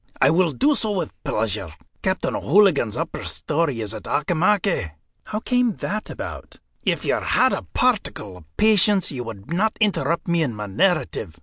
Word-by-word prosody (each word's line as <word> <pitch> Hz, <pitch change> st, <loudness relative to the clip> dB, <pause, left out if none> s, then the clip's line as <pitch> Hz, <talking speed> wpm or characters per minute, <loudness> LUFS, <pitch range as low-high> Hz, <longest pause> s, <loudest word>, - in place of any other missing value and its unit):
"I -, -, +5 dB
will 175 Hz, +1 st, +3 dB
do 285 Hz, -, +2 dB
so 220 Hz, -6 st, -1 dB
with 190 Hz, -, -2 dB
pleasure. 105 Hz, -7 st, -2 dB, 0.3 s
Captain -, -, -1 dB
O'Hooligan's 160 Hz, -, +3 dB
upper -, -, -4 dB
story 145 Hz, -6 st, -1 dB
is 105 Hz, 0 st, -3 dB
at 110 Hz, -, -8 dB
Auchimachie." 175 Hz, -, +1 dB, 0.3 s
"How 215 Hz, -, -3 dB
came 245 Hz, -4 st, +1 dB
that 215 Hz, +1 st, -4 dB
about?" -, -, -7 dB, 0.3 s
"If -, -, 0 dB
you -, -, +2 dB
had -, -, +2 dB
a -, -, -1 dB
particle 195 Hz, -, 0 dB
of 80 Hz, -3 st, -20 dB
patience, 210 Hz, -3 st, +4 dB
you 125 Hz, -3 st, -4 dB
would 115 Hz, +5 st, -8 dB
not 215 Hz, +5 st, +1 dB
interrupt 170 Hz, -7 st, 0 dB
me 170 Hz, -1 st, +2 dB
in 130 Hz, -8 st, -1 dB
my 105 Hz, 0 st, -5 dB
narrative. 105 Hz, -, 0 dB
165 Hz, 170 wpm, -22 LUFS, -, 0.3 s, I